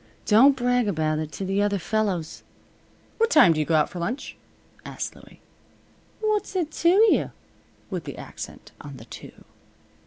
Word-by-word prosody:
Don't 265 +6 +6
brag 245 -2 +1
about 155 -4 0
it 155 -1 -5
to 195 - -5
the 195 +2 0
other 205 0 +1
fellows." 195 -4 -2 0.8
"What 455 0 +3
time 250 - +6
do 155 - -2
you 150 - -1
go 165 - +2
out 150 -1 +3
for 180 - -8
lunch?" 225 +11 -4 0.5
asked - - -6
Louie. - - -17 0.8
"What's 425 -2 -1
it 335 -4 -1
to 335 - +2
you?" 425 +5 +4 0.6
with - - -4
the - - -7
accent - - -9
on 140 -2 -10
the 110 - -12
"to." - - -11
205 Hz, 165 wpm, -24 LUFS, -, 0.8 s, Don't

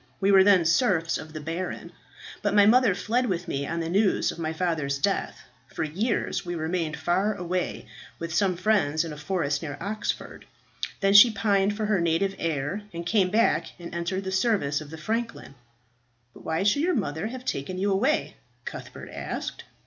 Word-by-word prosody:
We 195 0 +3
were 190 -1 +7
then 190 -4 +5
serfs 165 -1 +2
of 155 - -9
the 155 - -6
baron. 165 +4 -5 0.5
But - - 0
my 205 -1 +7
mother 225 -2 +5
fled 240 +6 0
with 180 -3 -2
me 140 -3 -2
on 170 0 -2
the 165 - -3
news 195 +3 +2
of - - -10
my 160 -1 -2
father's 160 -5 -1
death. 140 - -1 0.3
For - - -4
years 200 +9 -1
we 175 -1 -4
remained 160 -1 -2
far 185 +6 +1
away, 180 -1 -3 0.3
with 165 -1 -5
some 185 0 +2
friends 170 -6 +2
in 160 - -6
a - - -9
forest 145 -3 -1
near 145 -3 -5
Oxford. 210 +4 -4 0.6
Then 195 0 +3
she 210 +4 +10
pined 205 -1 +1
for 215 - -1
her 210 -4 +1
native 170 +4 +1
air, 160 +4 -2
and 170 -1 -6
came 190 0 +2
back 225 +4 +2
and 170 -1 -9
entered 180 +3 -2
the 190 - -4
service 190 -8 +1
of 150 - -10
the 160 - -8
franklin." 225 - -3 0.8
"But - - -15
why 160 +3 0
should 210 +8 +3
your 360 +2 +1
mother 175 - -2
have 255 +2 -8
taken 180 - -3
you 200 +2 0
away?" 250 +11 +1 0.3
Cuthbert - - -8
asked. - - -5
185 Hz, 185 wpm, -26 LUFS, 160-205 Hz, 0.8 s, she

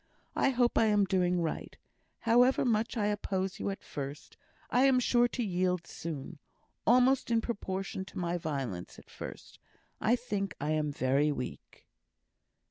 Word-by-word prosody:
I - - +3
hope 245 -2 +2
I 225 - +5
am 205 -2 +4
doing 180 -2 +1
right. 160 - -4 0.4
However 245 +4 +4
much 230 0 +1
I 210 - +1
oppose 195 -2 -1
you - - -1
at 195 - -5
first, 140 +1 -7 0.4
I 250 +2 +4
am 265 -2 +5
sure 245 -1 +3
to 240 0 -3
yield 180 -3 0
soon; 160 -1 -6 0.5
almost 250 +2 +4
in 230 -1 +3
proportion 195 -5 -3
to - - -11
my 175 -1 -1
violence 135 - -4
at - - -16
first. - - -9 0.4
I 235 - +3
think 205 -7 -3
I 150 +2 -1
am 155 -1 0
very 140 +2 +2
weak." 125 -3 -7
190 Hz, 155 wpm, -31 LUFS, 160-235 Hz, 0.5 s, I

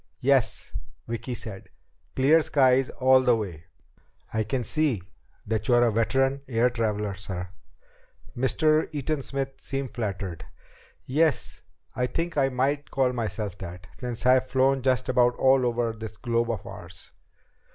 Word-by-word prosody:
"Yes," - - +1 0.3
Vicki 115 +2 -4
said. 105 -4 -7 0.5
"Clear 145 +5 +5
skies 130 -3 +3
all 130 0 +4
the 125 -2 +4
way. 90 -7 -5 0.7
I 110 - +1
can 125 +4 -2
see 135 - 0 0.4
that 110 -1 -2
you're 120 0 +5
a 120 - +3
veteran 135 +5 +1
air 125 0 +2
traveler, 105 -3 -1
sir." 90 -2 -5 0.9
Mr. 155 +5 +2
Eaton 150 0 -2
Smith 135 0 -3
seem 135 -1 -3
flattered. 100 -7 -4 0.6
"Yes, 155 +3 0 0.3
I 125 - 0
think 165 +5 -3
I 135 -2 +3
might 140 +3 -1
call 130 -2 +1
myself 105 -4 -3
that 90 0 -9
since 125 -2 -4
I've 130 0 +4
flown 135 +1 +2
just 130 -2 +1
about 125 -1 +3
all 130 -1 +4
over 120 -1 0
this 110 -1 -8
globe 120 -1 0
of 115 -5 -3
ours." - - -10
125 Hz, 140 wpm, -26 LUFS, 110-135 Hz, 0.9 s, Clear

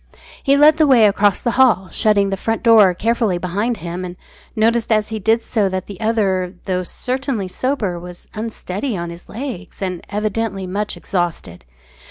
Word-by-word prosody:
He 275 +1 +3
led 300 +2 +6
the 310 -1 +4
way 245 -5 +6
across 205 -1 +2
the 235 - +1
hall, 215 -7 +4
shutting 200 -2 +2
the - - +1
front 225 +4 -2
door 215 -6 +6
carefully 225 -3 0
behind 205 +7 -2
him, 175 +1 -5
and 180 -1 -6 0.4
noticed 230 +1 +1
as 215 -1 +2
he 220 -1 -4
did 225 +3 +2
so 205 -4 0
that 185 0 -3
the 200 -1 -10
other, 195 -5 0
though 185 -2 0
certainly 250 +2 -3
sober, 205 -4 -2
was 180 0 -11
unsteady 215 +1 -4
on 170 0 -4
his 170 +1 -12
legs, 225 -6 -7
and 185 -3 -4
evidently 210 -1 -2
much 205 +3 -3
exhausted. 170 - -3
205 Hz, 175 wpm, -19 LUFS, 185-230 Hz, 0.4 s, led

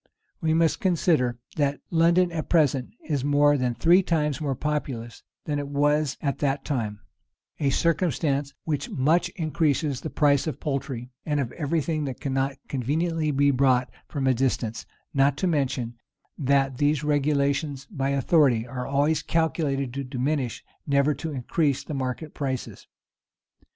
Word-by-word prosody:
[] - - -47
We 160 0 +2
must 165 -1 +2
consider 160 -9 +2 0.2
that 145 -1 +1
London 170 +2 +4
at 160 -2 -4
present 140 -6 +2 0.2
is 145 -5 -1
more 145 +1 +4
than 125 -3 0
three 170 - +5
times 155 -4 0
more 140 -3 -1
populous 130 -5 -3 0.2
than 145 -1 -1
it 145 - -4
was 145 0 +1
at 140 -2 -1
that 140 -1 0
time; 110 -8 -2 0.6
a 140 - +2
circumstance 145 -3 0
which 145 -3 -2
much 165 +6 +2
increases 155 -4 0
the 155 - -4
price 145 -1 +2
of 155 - -3
poultry, 135 -4 -3
and 150 -2 -1
of 125 -4 -2
every 160 0 -1
thing 155 0 -2
that 130 -2 -5
cannot 135 -1 -1
conveniently 155 +5 -1
be 140 0 +3
brought 130 -2 +2 0.2
from 140 -4 -3
a 130 - +4
distance: 115 -3 -1 0.3
not 140 0 +3
to 185 - -1
mention, 135 -8 0 0.4
that 135 -2 +1
these 145 0 +2
regulations 145 -1 0
by 135 -7 -1
authority 140 -4 +3
are 125 0 -5
always 145 +3 +2
calculated 145 -6 0
to 140 +1 -3
diminish, 130 0 -2 0.2
never 140 +1 +3
to 145 +4 -5
increase 140 +1 0
the - - -6
market 135 +3 -3
prices. 130 -3 -4
140 Hz, 155 wpm, -25 LUFS, 135-155 Hz, 0.6 s, three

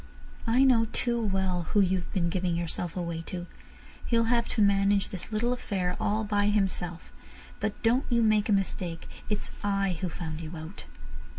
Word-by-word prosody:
I 245 +4 +4
know 245 -4 +5
too 235 -1 0
well 190 -4 0
who 210 - +5
you 190 -1 +3
have 170 - -8
been 170 -3 +1
giving 180 -2 0
yourself 170 +1 -3
away 170 -2 -2
to. 175 -1 -5 0.6
He'll 230 -1 +3
have 235 -1 +2
to 220 - 0
manage 200 0 +3
this 190 +3 -7
little 235 +3 +1
affair 185 -7 -2
all 215 +1 +1
by 205 -1 +1
himself. 190 -4 -1 0.5
But 215 -1 -2
don't 240 +4 +3
you 235 -2 +3
make 215 -1 +3
a - - +5
mistake, 180 -4 -2 0.2
it's 210 -1 -2
I 195 -4 0
who 185 - -1
found 160 -2 -5
you 165 +1 -6
out." 160 +5 -8
195 Hz, 180 wpm, -28 LUFS, 175-215 Hz, 0.6 s, know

